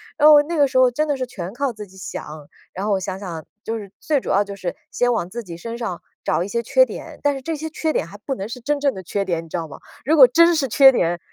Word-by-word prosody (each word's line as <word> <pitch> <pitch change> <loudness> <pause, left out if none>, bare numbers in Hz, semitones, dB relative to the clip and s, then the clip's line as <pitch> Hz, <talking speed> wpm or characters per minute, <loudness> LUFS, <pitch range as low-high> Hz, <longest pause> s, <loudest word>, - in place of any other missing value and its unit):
然 305 0 +6
后 295 -1 +9
那 335 +3 -4
个 285 -3 +3
时 260 - -1
候 255 -1 +6
真 300 +6 -1
的 290 -2 -1
是 255 -1 -3
全 190 -6 -6
靠 270 0 -2
自 210 -1 -8
己 190 -1 -18
想。 150 -5 -8 0.2
然 190 +2 -5
后 210 - +1
我 195 - +1
想 190 0 -4
想， 170 -5 -7 0.2
就 225 0 -2
是 200 -3 -9
最 295 -4 0
主 - - -6
要 - - +3
的 205 - +2
就 200 0 -7
是 180 -3 -4 0.2
先 245 0 +1
往 180 -7 -1
自 235 +4 -6
己 170 -4 -9
身 230 +6 -6
上 230 -8 -4 0.2
找 - - 0
一 - - -6
些 235 +3 -2
缺 - - +4
点， - - -9
但 290 -1 +1
是 270 - -6
这 325 +5 -3
些 315 +2 -5
缺 315 0 -2
点 165 - -1
还 200 - -11
不 265 +6 -4
能 195 -4 -5
是 245 +2 -8
真 290 +4 -1
正 280 -1 +1
的 190 - -8
缺 195 +3 -2
点， 170 -3 -2
你 165 - -15
知 175 - -3
道 165 -1 -4
吗？ 140 - -10 0.3
如 310 +5 +3
果 280 -4 +10
真 335 +5 +5
是 300 -4 +1
缺 270 +3 +7
点 175 -6 0
230 Hz, 335 characters per minute, -21 LUFS, 190-280 Hz, 0.3 s, 果